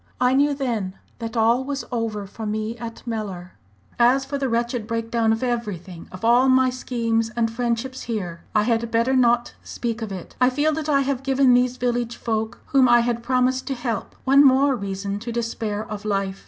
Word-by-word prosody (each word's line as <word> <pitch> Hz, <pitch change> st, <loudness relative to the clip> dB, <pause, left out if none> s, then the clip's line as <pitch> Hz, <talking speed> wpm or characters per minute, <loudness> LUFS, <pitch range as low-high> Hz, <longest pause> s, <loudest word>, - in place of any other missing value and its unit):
I 250 Hz, 0 st, +3 dB
knew 285 Hz, +2 st, +3 dB
then 225 Hz, -9 st, -2 dB, 0.2 s
that 230 Hz, 0 st, -5 dB
all 230 Hz, +3 st, +3 dB
was 275 Hz, 0 st, -4 dB
over 225 Hz, -4 st, -2 dB
for 215 Hz, +2 st, -7 dB
me 215 Hz, +2 st, -2 dB
at 230 Hz, 0 st, -8 dB
Mellor. 200 Hz, -6 st, -5 dB, 0.5 s
"As 255 Hz, +3 st, +4 dB
for 280 Hz, +1 st, -3 dB
the 270 Hz, -2 st, -1 dB
wretched 235 Hz, -1 st, -1 dB
break 230 Hz, 0 st, -3 dB
down 230 Hz, -2 st, +2 dB
of 225 Hz, +2 st, -1 dB
everything 205 Hz, -8 st, -4 dB
of 185 Hz, +4 st, -6 dB
all 245 Hz, +3 st, +5 dB
my 260 Hz, 0 st, +4 dB
schemes 230 Hz, -3 st, -1 dB
and 230 Hz, -1 st, +1 dB
friendships 240 Hz, +2 st, -2 dB
here 175 Hz, -7 st, -4 dB
I 210 Hz, -, +4 dB
had 230 Hz, 0 st, 0 dB
better 230 Hz, +3 st, +2 dB
not 240 Hz, -1 st, +3 dB
speak 235 Hz, -1 st, -4 dB
of 220 Hz, -2 st, -4 dB
it. 185 Hz, -3 st, -8 dB
I 250 Hz, -, +6 dB
feel 295 Hz, +4 st, +1 dB
that 310 Hz, 0 st, -3 dB
I 280 Hz, -2 st, +4 dB
have 270 Hz, -1 st, -1 dB
given 270 Hz, -1 st, +3 dB
these 250 Hz, 0 st, +2 dB
village 240 Hz, -1 st, -1 dB
folk, 220 Hz, 0 st, -3 dB
whom 265 Hz, -2 st, +4 dB
I 240 Hz, 0 st, +6 dB
had 235 Hz, 0 st, -1 dB
promised 255 Hz, +1 st, +1 dB
to 270 Hz, -, -1 dB
help, 240 Hz, -4 st, -4 dB
one 275 Hz, +2 st, +6 dB
more 270 Hz, 0 st, +5 dB
reason 200 Hz, -1 st, -4 dB
to 235 Hz, +3 st, -5 dB
despair 225 Hz, -2 st, -3 dB
of 210 Hz, -1 st, -7 dB
life. 195 Hz, -2 st, -1 dB
235 Hz, 200 wpm, -23 LUFS, 220-255 Hz, 0.5 s, I